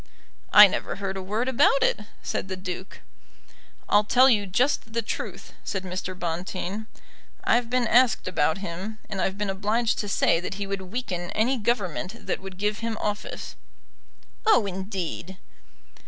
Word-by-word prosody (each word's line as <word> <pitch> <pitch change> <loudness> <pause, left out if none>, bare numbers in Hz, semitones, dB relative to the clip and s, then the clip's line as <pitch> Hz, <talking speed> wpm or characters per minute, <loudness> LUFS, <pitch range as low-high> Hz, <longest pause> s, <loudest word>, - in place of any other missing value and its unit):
"I 210 0 +11
never 195 - -1
heard 195 0 -4
a 190 - -4
word 215 +6 -1
about 275 +2 +4
it," - - +2 0.2
said - - -2
the 190 - -3
Duke. 185 0 -7 0.9
"I'll 205 +1 +5
tell 255 +5 +6
you 205 -3 +2
just 225 +3 +1
the 230 0 0
truth," - - -5
said 195 -2 -3
Mr. 185 0 -5
Bonteen. 185 +4 -4 0.6
"I've 240 -1 +2
been 250 0 +2
asked 245 -1 +4
about 160 -3 +1
him, 190 +6 -5
and 195 -2 -2
I've 190 +1 -1
been 205 -1 -1
obliged 215 +4 0
to 205 - -2
say 165 - +3
that 180 +3 -5
he 200 0 -3
would 195 0 -3
weaken 185 -3 -4
any 245 +5 +2
Government 210 - -2
that - - -2
would 190 -1 -9
give 210 +1 -1
him 230 -1 -3
office." 210 0 -4 0.9
"Oh, 430 - +5
indeed!" 190 -1 -4
200 Hz, 160 wpm, -26 LUFS, 185-225 Hz, 0.9 s, I